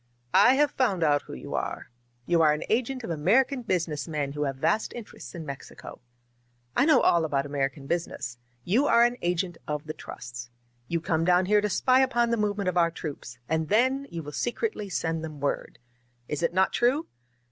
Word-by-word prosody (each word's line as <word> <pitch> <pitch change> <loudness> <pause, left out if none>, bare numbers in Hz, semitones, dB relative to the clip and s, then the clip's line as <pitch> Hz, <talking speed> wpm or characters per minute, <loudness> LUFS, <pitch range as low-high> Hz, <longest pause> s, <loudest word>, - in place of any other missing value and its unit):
"I 205 +7 +7
have 295 0 +3
found 200 -10 +1
out 145 -2 +3
who - - -8
you 65 - -7
are. - - -4 0.3
You 170 -1 +3
are 155 -2 +5
an 150 - -3
agent 250 +2 0
of 200 - -4
American 240 - +2
business 165 - -1
men 150 -3 -2
who 150 +1 -2
have 135 -1 -2
vast 210 +11 0
interests 230 -5 -9
in 165 -2 -6
Mex 140 -2 -7
ico. - - -11 0.8
I 270 - +4
know 315 - +5
all 170 -1 +4
about 140 -3 0
American 140 -1 -2
business. 135 -6 -3 0.2
You 240 - +2
are 235 - +6
an 240 0 +1
agent 175 0 -1
of 150 0 -3
the 155 - -5
trusts. 120 -3 -9 0.4
You 170 -1 -1
come 160 0 0
down 180 +1 +4
here 210 +2 +4
to 210 - 0
spy 255 +7 +3
upon 240 -3 +2
the 235 - +2
movement 205 -2 -1
of 180 -1 0
our 170 -1 +4
troops, 145 -7 -7
and 160 0 -1
then 260 +5 +2
you 165 -1 -6
will 150 - -7
se 240 - -2
cretly 215 - -3
send 165 -2 -1
them 155 -2 -7
word. 140 0 -2 0.5
Is 150 - -3
it 170 - +1
not 190 +2 +2
true?" 260 +7 +2
170 Hz, 205 wpm, -27 LUFS, 150-235 Hz, 0.8 s, I